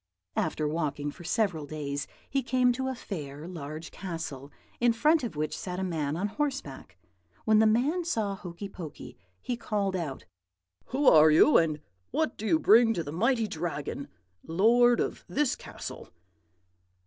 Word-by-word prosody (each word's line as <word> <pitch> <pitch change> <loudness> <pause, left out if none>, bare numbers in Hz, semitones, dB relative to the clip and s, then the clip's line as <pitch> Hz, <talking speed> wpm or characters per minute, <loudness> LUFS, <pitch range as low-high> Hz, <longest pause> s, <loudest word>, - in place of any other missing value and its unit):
"After 155 -1 0
walking 145 -2 -2
for 175 - -13
several 175 -5 0
days, 140 -2 -4 0.2
he 275 - 0
came 250 0 +3
to 260 +2 -2
a 260 - -2
fair, 150 - -7
large 155 -2 -7
castle, 160 -7 -6 0.3
in 240 -1 +4
front 300 +7 +3
of 230 - -4
which 155 0 -2
sat 180 -1 -5
a - - -1
man 160 -4 -2
on 195 +4 0
horseback. 280 +3 -4 0.5
When 215 -1 +5
the 220 - +6
man 275 +11 +2
saw 220 -12 -1
Hokey 185 +1 -7
Pokey, 170 -6 -9 0.2
he 245 - -3
called 205 -4 -1
out, 155 -7 -4 0.6
"'Who 275 +3 -1
are 155 0 +8
you, 160 - +6
and 155 -3 +1 0.3
what 315 -1 0
do 220 - -5
you 320 - +4
bring 225 -4 +5
to 170 - -1
the 145 - -6
mighty 230 - +2
Dragon, 155 -5 -4 0.4
lord 235 +8 +4
of - - -2
this 290 -2 +1
castle?' - - -9
190 Hz, 160 wpm, -29 LUFS, 155-240 Hz, 0.6 s, are